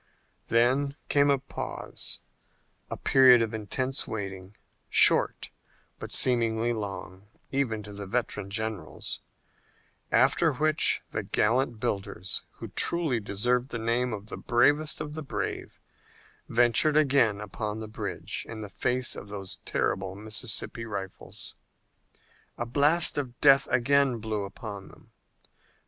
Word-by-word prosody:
Then 130 +5 +2
came 145 0 +4
a 140 - +4
pause, 135 +1 -5 0.7
a - - -4
period 130 -3 +6
of 115 - -4
intense 130 +5 -1
waiting, 95 -2 -6 0.3
short, - - +4 0.5
but - - -7
seemingly 115 -1 +2
long, 100 -2 -6 0.2
even 120 -6 -1
to 105 0 -9
the 100 -1 -6
veteran 105 -2 -2
generals, 110 -5 -4 0.9
after 165 -3 +3
which 155 +3 +3
the - - -2
gallant 120 +1 +1
builders, 100 -5 -3
who - - -9
truly 160 -8 +1
deserved 120 +5 -1
the 115 - -4
name 120 +2 0
of 105 -2 -5
the - - -7
bravest 145 +6 +2
of 150 - -5
the 155 - -5
brave, 105 -9 -5 0.7
ventured 120 +6 +4
again 135 -8 +3
upon 105 +1 -4
the 110 - -6
bridge 110 - -4
in 110 -1 -7
the 105 - -7
face 125 0 -1
of - - -9
those 95 -3 -7
terrible 95 0 -1
Mississippi 110 +2 -2
rifles. 100 -4 -7 1.0
A 120 - -2
blast 145 +6 +3
of 125 -4 -6
death 135 -1 +6
again 130 +1 +3
blew 110 -2 -3
upon 100 0 -8
them. - - -18
115 Hz, 130 wpm, -28 LUFS, 105-135 Hz, 1.0 s, period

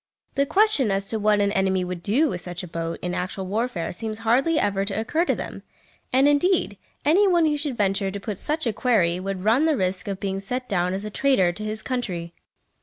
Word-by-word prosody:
The 280 0 +1
question 395 - +4
as 195 0 -1
to 220 - -1
what 210 0 +3
an 200 0 +2
enemy 190 -1 +1
would 180 -1 -5
do 250 - +2
with 180 - -4
such 180 0 -6
a - - -6
boat 165 0 -4
in 180 0 -2
actual 185 +2 -3
warfare 210 -2 -2
seems 215 +3 -5
hardly 270 +8 +3
ever 200 -1 0
to 200 +1 -2
occur 315 +10 0
to - - +1
them; - - -7 0.5
and, 265 +2 +4
indeed, 290 - +2 0.3
any 370 +8 +5
one 345 -3 +4
who 300 -1 +2
should 290 -4 -3
venture 195 -1 +1
to 200 +1 -5
put 200 -1 -5
such 310 0 -2
a 230 - 0
query 200 -7 +2
would 190 0 -4
run 230 +8 +3
the 315 -3 +2
risk 185 0 -1
of 195 -1 -3
being 195 -2 -2
set 250 +6 -4
down 180 -1 0
as 200 +2 -5
a 210 - -5
traitor 230 -9 +3
to 210 +5 -6
his 215 0 -4
country! 180 -10 -3
210 Hz, 230 wpm, -24 LUFS, 190-265 Hz, 0.5 s, any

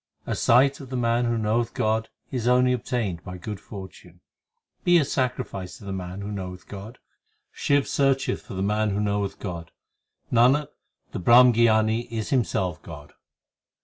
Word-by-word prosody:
A - - -2
sight 135 +4 +4
of 135 - -10
the 130 - -3
man 120 0 +1
who 120 -1 0
knoweth 115 +2 0
God 110 +1 0 0.2
is 120 -3 -2
only 125 0 +4
obtained 110 -9 -2
by 90 -1 -7
good 105 +2 -6
fortune; 95 -3 -11 0.6
Be 175 0 +5
a 155 - +3
sacrifice 125 -8 -3
to - - -14
the 100 - -5
man 95 +1 -6
who 100 +1 -5
knoweth 90 -2 -7
God; 105 +4 -9 0.5
Shiv 140 -1 +1
searcheth 135 -1 +1
for - - -10
the 95 - -2
man 105 +1 +1
who 100 0 -1
knoweth 100 -1 -1
God 85 -4 -6 0.6
Nanak, 130 +5 +4 0.4
the - - -4
Brahmgyani 115 +1 +5
is 110 -2 -4
himself 95 - 0
God. 75 -3 -11
110 Hz, 160 wpm, -25 LUFS, 95-125 Hz, 0.6 s, Be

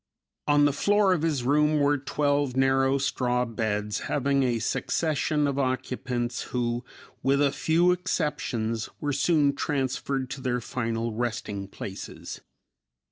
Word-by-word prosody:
On 145 0 +5
the 145 - +3
floor 200 +5 +3
of 175 - 0
his 155 -6 0
room 150 +3 +3
were 145 0 +3
twelve 145 -1 0
narrow 135 0 +3
straw 125 -2 0
beds 105 -2 -2
having 140 0 +1
a 125 -3 +1
succession 150 +5 0
of 140 -1 -1
occupants 125 -2 -2
who, 120 -1 -1 0.4
with 140 +1 +2
a 145 -1 +3
few 170 +5 +3
exceptions, 130 -11 -1
were 145 -1 -1
soon 145 -2 +3
transferred 135 -2 -2
to 140 - -5
their 125 -1 0
final 115 -1 -2
resting 110 -4 -3
places. 95 0 -8
135 Hz, 135 wpm, -27 LUFS, 120-145 Hz, 0.4 s, On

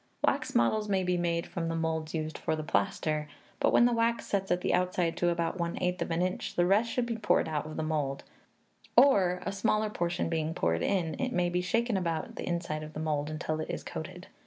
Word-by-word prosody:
Wax - - +1
models 210 - +2
may 190 -2 +2
be 180 0 +1
made 170 -1 0
from 165 -1 -3
the 165 - -1
moulds 160 -1 -2
used 155 0 -3
for - - -1
the 155 - -4
plaster; 150 +6 0 0.3
but - - +3
when 240 - +6
the 245 - +3
wax 230 0 +1
sets 195 -1 -1
at 180 0 +1
the - - +1
outside 180 -2 +1
to 175 - +2
about 170 +1 -1
one 170 0 -2
eighth 180 0 -1
of - - -1
an 165 +1 +1
inch, 185 0 -3
the 175 - +3
rest 205 +6 +3
should 250 0 0
be 230 -1 -3
poured 210 - +2
out 155 -1 -2
of 155 - -7
the 160 - -1
mould; 150 -3 -1 0.7
or, 190 -9 +5
a - - -1
smaller 215 +2 +1
portion 175 -3 -1
being 160 -1 -1
poured 85 0 +1
in, 170 - 0
it 260 -1 -1
may 180 -3 +2
be 180 +1 0
shaken 225 +4 +1
about 165 -3 -2
the - - -5
inside 170 -3 -2
of 155 0 -8
the - - -5
mould 150 -1 -1
until 155 0 -3
it 155 - -4
is - - -4
coated. 180 +3 -7
175 Hz, 235 wpm, -30 LUFS, 155-190 Hz, 0.7 s, when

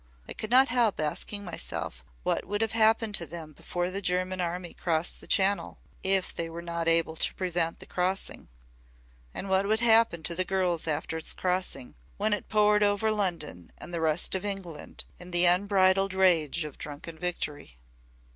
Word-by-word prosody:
I - - -5
could 215 - -6
not 260 +3 +6
help 235 -4 +2
asking 200 +7 -3
myself 65 - -5 0.2
what - - 0
would 205 +2 -2
have 225 -1 0
happened 225 0 +3
to 170 -4 +1
them 160 -2 -9
before 175 +4 -3
the 195 +1 -3
German 185 0 0
army 175 0 -4
crossed 165 0 -1
the - - -10
Channel 200 +1 +2 0.2
if 190 -1 +1
they 165 0 -3
were 170 +1 -7
not 170 -1 -3
able 165 -1 +3
to - - 0
prevent 175 -3 0
the - - -10
crossing. 185 +2 -2 0.8
And 195 - -5
what 190 +1 +2
would 220 +2 +1
happen 225 -7 +4
to 170 - -1
the 185 +2 0
girls 180 -4 0
after 160 +1 -2
its 160 - 0
crossing, 180 -8 -2 0.2
when 215 +1 +1
it 210 - -4
poured 210 -1 +4
over 205 +1 +2
London 170 - -3
and 175 - -9
the 170 - -2
rest 160 +1 +2
of 190 - -2
England 195 -7 -6
in 180 - -9
the 175 0 +6
unbridled 190 +1 +4
rage 170 -4 +3
of 150 -3 -9
drunken 150 +2 -8
victory." 150 - -4
180 Hz, 180 wpm, -28 LUFS, 165-200 Hz, 0.8 s, not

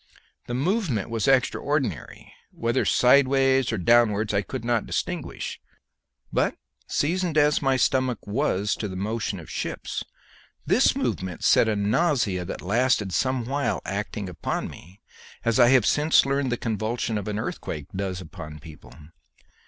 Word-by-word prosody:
The 120 - -3
movement 150 - -1
was 115 -2 -1
extraordinary 135 - 0 0.2
whether 115 0 -1
sideways 135 0 +4
or 115 - -1
downwards 105 +1 +3
I 100 - +2
could 115 +4 -6
not 120 -2 0
distinguish; - - -4 0.7
but, - - +1 0.3
seasoned 170 +1 0
as 150 0 +4
my 135 -2 +2
stomach 130 -2 +1
was 105 -3 0
to 105 - -3
the 95 - -7
motion 105 0 -3
of 80 - -11
ships, - - -4 0.6
this - - +3
movement 90 -2 -3
set - - +5
up - - +2
a - - -2
nausea 105 - +1
that - - -6
lasted 105 -1 +1
some 130 0 0
while, 140 +3 -1
acting 100 +2 -4
upon 90 - -3
me 90 +6 -15 0.4
as 115 +1 +2
I 120 - +7
have 130 -5 +5
since 150 0 +4
learned 135 -1 0
the 120 - 0
convulsion 110 +1 -2
of 100 - -7
an 105 -1 -2
earthquake 75 -8 -4
does 95 -1 -3
upon 75 -2 -9
people. 75 0 -13
115 Hz, 150 wpm, -25 LUFS, 100-135 Hz, 0.7 s, I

